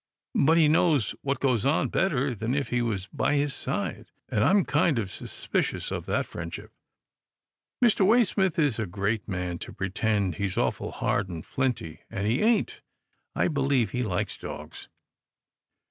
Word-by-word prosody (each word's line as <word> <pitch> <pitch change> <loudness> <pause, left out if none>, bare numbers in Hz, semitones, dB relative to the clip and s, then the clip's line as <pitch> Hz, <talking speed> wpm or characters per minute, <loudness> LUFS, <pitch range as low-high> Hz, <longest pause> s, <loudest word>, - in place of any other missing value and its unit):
But 160 +4 +4
he 160 -2 +6
knows 150 - +3
what 140 0 -1
goes 125 -6 +1
on 140 +4 +2
better 140 -8 +1
than 115 +4 -2
if 140 -1 -1
he 120 -1 +1
was 105 -5 -1
by - - +1
his 145 -1 +1
side, - - -4 0.2
and 105 - +1
I'm 195 - +4
kind 155 -7 +2
of 100 -5 -2
suspicious - - -3
of - - -4
that - - 0
friendship. 85 -1 -7 1.1
Mr. 215 -4 +4
Waysmith 190 -4 +3
is 145 -8 +2
a 110 - -1
great 100 +4 -2
man 90 -3 -3
to - - -7
pretend 95 -2 -1
he's 100 -2 -2
awful - - 0
hard 100 -1 -1
and 85 -2 -6
flinty, 125 - -2
and 100 0 -3
he 115 +5 +1
ain't. 220 -1 +2 0.5
I - - +2
believe 135 - +1
he 125 - -1
likes 100 -7 -2
dogs." - - -8
125 Hz, 160 wpm, -27 LUFS, 100-150 Hz, 1.1 s, he